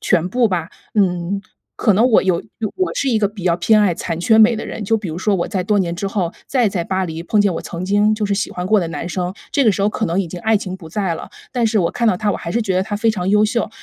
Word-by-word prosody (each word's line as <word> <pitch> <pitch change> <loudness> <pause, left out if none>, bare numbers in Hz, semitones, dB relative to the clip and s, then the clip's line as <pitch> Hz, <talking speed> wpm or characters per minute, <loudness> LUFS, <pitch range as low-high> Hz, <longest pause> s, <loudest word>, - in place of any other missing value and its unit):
全 175 -1 +1
部 235 +3 +2
吧。 170 -3 -2 0.2
嗯， 185 -1 +1 0.4
可 215 - +3
能 225 +6 +4
我 225 - +5
有 185 -3 +1 0.3
我 370 -1 -1
是 275 - 0
一 230 - +2
个 210 - +2
比 205 -1 -10
较 170 -1 +2
偏 215 +5 +4
爱 190 -5 +3
残 165 -1 -4
缺 220 +4 +4
美 225 +2 +6
的 215 - -5
人， 215 - -5
就 225 +3 +2
比 205 -5 -5
如 160 - -5
说 200 +2 +1
我 175 - -1
在 190 -3 -1
多 205 +2 +2
年 175 -3 0
之 195 - -3
后， 190 -4 -1
再 250 -5 +2
在 180 -4 -2
巴 190 0 -1
黎 165 -2 -5
碰 210 - +2
见 205 -2 +2
我 - - -3
曾 175 +1 -6
经 205 +2 +3
就 215 -1 -2
是 200 - -1
喜 205 - -2
欢 180 - -4
过 215 +2 +4
的 170 - -2
男 165 +1 -5
生， 180 +1 -3 0.2
这 280 - +2
个 220 - +5
时 195 - -2
候 205 - +3
可 215 +1 -2
能 175 +4 0
已 180 - -3
经 180 - -7
爱 220 +2 +3
情 190 -2 -4
不 170 -4 -12
在 185 0 -1
了， - - -8 0.2
但 245 -3 +1
是 220 -1 +1
我 170 - +1
看 235 - -1
到 185 - +2
他， 210 +3 0
我 - - -2
还 170 - -6
是 235 0 +1
觉 190 -3 -1
得 185 - +2
他 205 - -4
非 225 +1 +2
常 185 -4 -2
优 210 +2 +4
秀。 230 +1 0
200 Hz, 335 characters per minute, -19 LUFS, 180-215 Hz, 0.4 s, 美